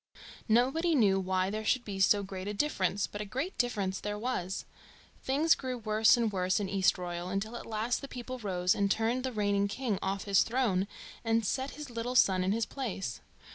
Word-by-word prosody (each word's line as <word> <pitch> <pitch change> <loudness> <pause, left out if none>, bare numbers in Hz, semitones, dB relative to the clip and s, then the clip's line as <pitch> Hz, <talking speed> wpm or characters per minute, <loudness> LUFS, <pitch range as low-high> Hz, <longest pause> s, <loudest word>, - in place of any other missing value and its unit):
Nobody 270 +9 +3
knew 200 -7 +4
why 185 0 0
there 215 +1 -3
should 240 +3 +1
be 195 -2 -5
so 200 +1 +4
great 190 0 -6
a 210 - -3
difference, 200 -7 0
but 205 - -7
a - - -1
great 265 - -4
difference 200 -6 0
there 210 0 -3
was. 210 -5 -3 0.6
Things 295 +5 +3
grew 255 -2 -4
worse 220 +1 +4
and 230 -2 +1
worse 185 0 +1
in 205 - -2
Eastroyal, 180 -2 0
until 195 +5 -3
at - - -7
last 225 +2 -1
the 275 - -6
people 255 0 -7
rose 185 -4 +1
and 200 0 +1
turned 230 +5 +1
the 260 - -2
reigning 205 -2 +1
king 210 -1 -2
off 195 0 -2
his 200 -2 +4
throne 225 -6 +1 0.4
and 225 -1 +1
set 265 +6 -2
his 300 -4 -7
little 235 +2 -3
son 190 -6 +4
in 185 - +1
his 225 +1 +1
place. 195 - -4
210 Hz, 200 wpm, -31 LUFS, 195-245 Hz, 0.6 s, knew